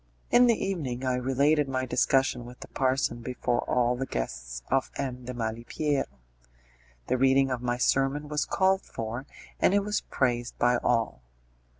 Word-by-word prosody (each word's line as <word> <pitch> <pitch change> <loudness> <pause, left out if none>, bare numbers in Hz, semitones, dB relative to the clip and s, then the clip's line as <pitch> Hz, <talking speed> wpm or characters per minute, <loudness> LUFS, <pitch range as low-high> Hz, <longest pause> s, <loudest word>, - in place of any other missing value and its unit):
In 245 0 +7
the 235 - +5
evening 135 -10 -3
I 130 - +1
related 135 +3 +2
my 130 -1 -1
discussion 130 -1 +2
with 125 +1 -12
the - - -8
parson 130 -2 0
before 125 0 -1
all 125 0 +2
the 135 +2 -3
guests - - -4
of 135 -1 +2
M. 125 -3 -4
de 125 - -4
Malipiero. 120 +6 -1 1.0
The 130 - 0
reading 135 0 +4
of 125 -1 -2
my 120 -1 -1
sermon 135 +4 +1
was 150 0 0
called 190 0 +2
for, 115 +5 -6 0.3
and 195 - +4
it 205 - +3
was 210 +1 -1
praised 120 -2 -1
by 125 0 +3
all. 115 - 0
130 Hz, 165 wpm, -28 LUFS, 120-140 Hz, 1.0 s, In